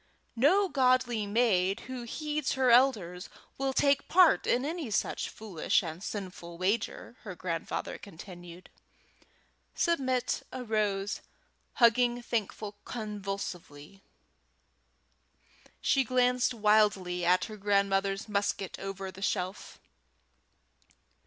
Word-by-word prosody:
"No 350 Hz, -, +4 dB
godly 255 Hz, -, +2 dB
maid 200 Hz, -4 st, +2 dB
who 255 Hz, -1 st, -7 dB
heeds 300 Hz, +3 st, -2 dB
her 260 Hz, -2 st, +3 dB
elders 210 Hz, -8 st, +3 dB, 0.3 s
will 270 Hz, 0 st, 0 dB
take 280 Hz, +1 st, +2 dB
part 360 Hz, -1 st, +5 dB
in 250 Hz, +3 st, +2 dB
any 320 Hz, -4 st, -3 dB
such 205 Hz, -, -1 dB
foolish 205 Hz, -4 st, -1 dB
and 165 Hz, +2 st, -6 dB
sinful 180 Hz, -5 st, -6 dB
wager," 205 Hz, +5 st, -2 dB
her 195 Hz, -5 st, -8 dB
grandfather 170 Hz, -2 st, -4 dB
continued. 175 Hz, -1 st, -11 dB, 1.0 s
Submit 260 Hz, -7 st, 0 dB
arose, 210 Hz, -5 st, -1 dB, 0.5 s
hugging 240 Hz, 0 st, +4 dB
Thankful 210 Hz, -2 st, -3 dB
convulsively. 195 Hz, -, -6 dB, 1.8 s
She 270 Hz, -, +3 dB
glanced 250 Hz, 0 st, +2 dB
wildly 210 Hz, -5 st, +2 dB
at 180 Hz, +1 st, +3 dB
her 215 Hz, -, -8 dB
great 205 Hz, -, -16 dB
grandmother's 200 Hz, 0 st, +1 dB
musket 200 Hz, -2 st, -2 dB
over 195 Hz, -1 st, -5 dB
the 190 Hz, -, -13 dB
shelf. 185 Hz, 0 st, -3 dB
210 Hz, 100 wpm, -30 LUFS, 190-250 Hz, 1.8 s, part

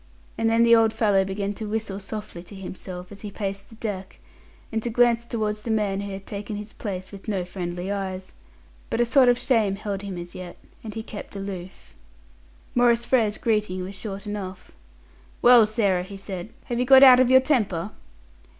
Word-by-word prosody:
And 225 Hz, -, +1 dB
then 230 Hz, +1 st, +4 dB
the 235 Hz, 0 st, +7 dB
old 225 Hz, -1 st, +4 dB
fellow 205 Hz, -4 st, +3 dB
began 200 Hz, +1 st, -3 dB
to 215 Hz, +1 st, -6 dB
whistle 215 Hz, -2 st, -3 dB
softly 210 Hz, -3 st, -7 dB
to 200 Hz, -, -11 dB
himself 185 Hz, -1 st, -8 dB
as 205 Hz, -, -10 dB
he 210 Hz, -, -6 dB
paced 195 Hz, -1 st, -5 dB
the 225 Hz, -, -14 dB
deck, 200 Hz, -4 st, -5 dB, 0.5 s
and 225 Hz, -1 st, -1 dB
to 240 Hz, -, -2 dB
glance 235 Hz, 0 st, +3 dB
towards 215 Hz, -2 st, -2 dB
the 230 Hz, -, -6 dB
man 205 Hz, -3 st, 0 dB
who 200 Hz, 0 st, -5 dB
had 195 Hz, 0 st, -7 dB
taken 210 Hz, +1 st, -5 dB
his 210 Hz, +1 st, -7 dB
place 190 Hz, -3 st, -6 dB
with 200 Hz, +1 st, -11 dB
no 195 Hz, -4 st, -1 dB
friendly 180 Hz, +1 st, -4 dB
eyes. 190 Hz, -2 st, -4 dB, 0.6 s
But -, -, -1 dB
a 240 Hz, -, +4 dB
sort 250 Hz, +1 st, +5 dB
of 245 Hz, -, +4 dB
shame 220 Hz, -7 st, +2 dB
held 200 Hz, -1 st, -4 dB
him 195 Hz, -3 st, -6 dB
as 175 Hz, 0 st, -7 dB
yet, 180 Hz, -1 st, -8 dB, 0.3 s
and 220 Hz, -1 st, -7 dB
he 220 Hz, -, -4 dB
kept 210 Hz, -1 st, -9 dB
aloof. 190 Hz, -2 st, -7 dB, 0.8 s
Maurice 240 Hz, -1 st, +3 dB
Frere's 220 Hz, -5 st, +2 dB
greeting 210 Hz, -5 st, 0 dB
was 190 Hz, +2 st, -6 dB
short 195 Hz, +1 st, -6 dB
enough. 195 Hz, -3 st, -6 dB, 0.7 s
"Well, 240 Hz, -3 st, +7 dB
Sarah," 205 Hz, -5 st, +1 dB
he 195 Hz, +2 st, -8 dB
said, 195 Hz, -1 st, -6 dB, 0.2 s
"have 240 Hz, -1 st, -2 dB
you 250 Hz, -, +2 dB
got 265 Hz, +1 st, +8 dB
out 255 Hz, -2 st, +9 dB
of 255 Hz, -1 st, +4 dB
your 260 Hz, 0 st, +7 dB
temper?" 215 Hz, -, 0 dB
205 Hz, 195 wpm, -24 LUFS, 195-225 Hz, 0.8 s, out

